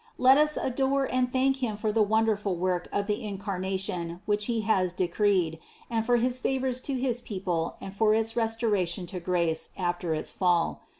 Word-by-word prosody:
Let 260 +2 +6
us 300 0 +3
adore 270 +1 +1
and 250 -1 +1
thank 265 +1 +2
Him 235 -5 -2
for 215 0 -1
the 220 +1 +2
wonderful 215 -2 +1
work 180 0 -1
of 200 - 0
the 210 +3 -2
In 205 -2 -4
carnation 190 -3 -3
which 205 0 +1
He 230 -1 0
has 190 -4 +1
decreed, 180 -2 +1 0.3
and 225 -1 +1
for 240 +2 +2
his 250 +1 +1
favors 260 -1 -1
to 275 - 0
his 250 -2 -1
people 185 -7 -3
and 195 - -8
for 215 +1 +3
its 225 0 -1
restoration 220 -6 0
to 180 +1 -6
grace 170 -2 0
after 175 -2 -1
its 155 - -4
fall. 175 -3 +1
210 Hz, 185 wpm, -28 LUFS, 180-240 Hz, 0.3 s, Let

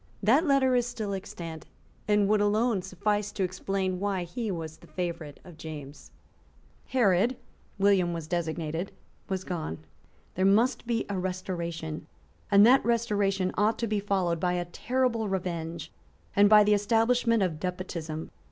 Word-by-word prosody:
That 270 - +4
letter 270 -2 +4
is 245 -1 +2
still 215 -4 -4
extant, 170 -5 -7 0.4
and 210 -1 +3
would 210 0 +3
alone 210 0 +2
suffice 205 +3 -1
to 195 - -1
explain 185 0 -2
why 195 -2 -1
he 215 +6 -4
was 160 -4 -5
the - - -17
favourite 170 -5 -5
of 170 -4 -14
James. 150 -3 -9 0.8
Herod, 230 -2 +3
so - - -19 0.4
William 195 -3 +3
was 165 -2 -4
designated, 165 +1 -3 0.4
was 190 -1 -2
gone. 160 - -4 0.6
There 185 - -1
must 225 +6 +3
be 230 -2 0
a 200 -2 -2
restoration; 170 -4 -4 0.4
and 200 0 +7
that 260 +3 +6
restoration 205 -5 +1
ought 215 +2 +2
to 235 - -1
be 215 -2 0
followed 190 -4 0
by 180 0 +1
a 175 0 -1
terrible 230 +3 -1
revenge 170 -3 -4 0.4
and 205 0 +6
by 210 -1 +8
the 210 0 +4
establishment 225 +2 +2
of 165 -5 -2
despotism. 170 -3 -5
195 Hz, 150 wpm, -28 LUFS, 175-215 Hz, 0.8 s, by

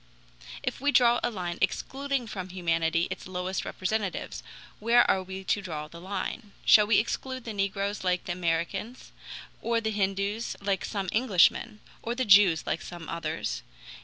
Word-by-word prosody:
If - - -3
we 285 +1 +3
draw 240 -2 +5
a - - +1
line 180 -5 -4
excluding 275 -2 -1
from 190 -4 -6
humanity 165 -2 +1
its - - -6
lowest 185 +1 -3
representatives, 200 0 -3 0.4
where 235 +3 +5
are 190 - +3
we 190 +1 -7
to 205 - 0
draw 155 -5 -5
the 170 +2 -12
line? 200 +3 -5
Shall 210 -1 +7
we 210 - +5
exclude 260 +3 -2
the 225 - -5
negroes 200 0 -1
like 180 -1 +1
the - - -4
Americans, 175 +7 -2 0.5
or 235 0 +1
the 220 -1 -2
Hindoos 200 +2 -1
like 195 -1 -1
some 195 -2 -3
Englishmen, 215 -1 +3 0.2
or 235 +1 -3
the 255 0 0
Jews 195 -6 +6
like - - -1
some 175 -2 -8
others? 115 - -3
195 Hz, 160 wpm, -28 LUFS, 180-225 Hz, 0.5 s, Shall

